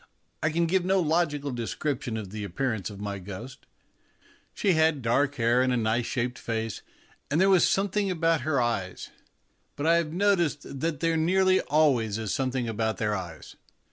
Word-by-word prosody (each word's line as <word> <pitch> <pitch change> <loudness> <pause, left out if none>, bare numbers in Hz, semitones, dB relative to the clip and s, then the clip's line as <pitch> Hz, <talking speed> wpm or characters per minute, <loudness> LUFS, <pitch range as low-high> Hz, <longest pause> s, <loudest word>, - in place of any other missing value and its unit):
I 155 - +2
can 170 +2 +1
give 185 +2 +1
no 190 +1 +2
logical 155 -4 0
description 120 0 -3
of 100 -4 -6
the 105 0 -5
appearance 110 +2 -2
of 100 -2 -10
my 100 -1 -4
ghost. 105 +7 -9 0.9
She 200 - +2
had 160 -4 +2
dark 140 +5 +1
hair 120 0 +2
and 130 0 +2
a 125 - +1
nice 115 +1 0
shaped 125 0 -2
face, 115 -2 -3 0.5
and 145 +3 +1
there 195 +1 +5
was 185 -4 +5
something 200 +1 0
about 165 -3 +1
her 140 0 0
eyes 105 -7 -2 0.6
but 145 - -4
I 165 +1 +5
have 165 -2 -1
noticed 175 -5 +1 0.2
that 160 -1 -2
there 165 -1 +1
nearly 185 +3 +3
always 135 -9 +2
is 110 -3 -3
something 130 -2 -1
about 110 0 -1
their 105 -1 0
eyes. 90 -3 -8
135 Hz, 175 wpm, -27 LUFS, 115-165 Hz, 0.9 s, there